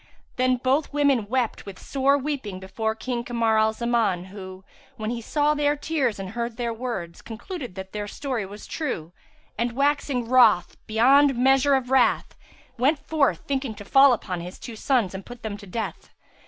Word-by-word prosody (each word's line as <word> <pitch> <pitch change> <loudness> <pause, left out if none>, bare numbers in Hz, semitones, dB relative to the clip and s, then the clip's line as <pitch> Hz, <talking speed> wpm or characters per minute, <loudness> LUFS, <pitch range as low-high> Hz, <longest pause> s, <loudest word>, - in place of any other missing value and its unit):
Then 255 0 +2
both 265 +4 +1
women 280 -7 +2
wept 250 -4 -1
with 195 -2 -8
sore 275 +1 +1
weeping 270 -9 -4
before 220 +4 -3
King 240 +1 -3
Kamar 230 -2 +1
al 220 0 +3
Zaman 220 -6 0
who, 190 -1 -9 0.3
when 215 +1 -3
he 240 -1 -4
saw 295 +5 +1
their 290 0 +1
tears 290 -6 -1
and 195 -1 -6
heard 235 0 -4
their 235 -2 -2
words, 225 -8 -5
concluded 240 - -7
that 190 0 -7
their 210 -1 -4
story 255 -1 -3
was 205 +2 -9
true 175 - -4 0.5
and, 235 0 0
waxing 280 -2 0
wroth 230 -7 +5
beyond 270 +5 +5
measure 270 +2 +4
of 260 -1 -2
wrath, 265 - +3 0.5
went 285 +5 +3
forth 280 - 0
thinking 270 -5 -2
to 205 - -10
fall 270 +4 +6
upon 185 -7 -2
his 180 +2 -8
two 235 - -8
sons 225 -5 +1
and 190 +1 -6
put 245 +2 -12
them 215 -2 -3
to 200 -1 -12
death. 220 +4 -5
240 Hz, 180 wpm, -25 LUFS, 210-270 Hz, 0.5 s, fall